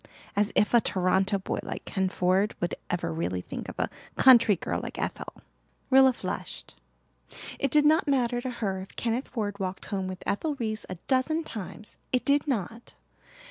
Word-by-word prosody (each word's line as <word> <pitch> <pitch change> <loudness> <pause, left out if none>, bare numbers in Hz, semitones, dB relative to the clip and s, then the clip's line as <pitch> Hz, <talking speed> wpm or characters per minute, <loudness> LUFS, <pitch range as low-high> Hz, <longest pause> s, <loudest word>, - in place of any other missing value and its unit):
As 205 +1 +2
if 210 - +3
a 235 - +7
Toronto 190 +1 +2
boy 190 - -3
like - - -6
Ken 190 -2 0
Ford 185 +4 +1
would 175 - -1 0.2
ever 170 - -1
really 90 +3 -2
think - - -7
of - - -9
a - - +1 0.3
country 235 -5 +7
girl - - -3
like - - -7
Ethel!" - - -5 0.5
Rilla 265 0 +7
flushed. 245 - -6 0.8
It 275 - +1
did 295 +2 +4
not 310 +1 +4
matter 245 -3 +1
to 255 - -3
her 200 -6 -2
if 190 - -11
Kenneth 235 +3 -1
Ford 205 -4 -3
walked 190 0 -4
home 195 -2 -2
with 185 0 -6
Ethel 295 +9 -1
Reese 220 -4 -3
a - - -4
dozen 295 +5 +1
times 215 - -8
it 255 - +1
did 285 +1 +3
not! 230 -2 -3
215 Hz, 180 wpm, -28 LUFS, 190-260 Hz, 0.8 s, a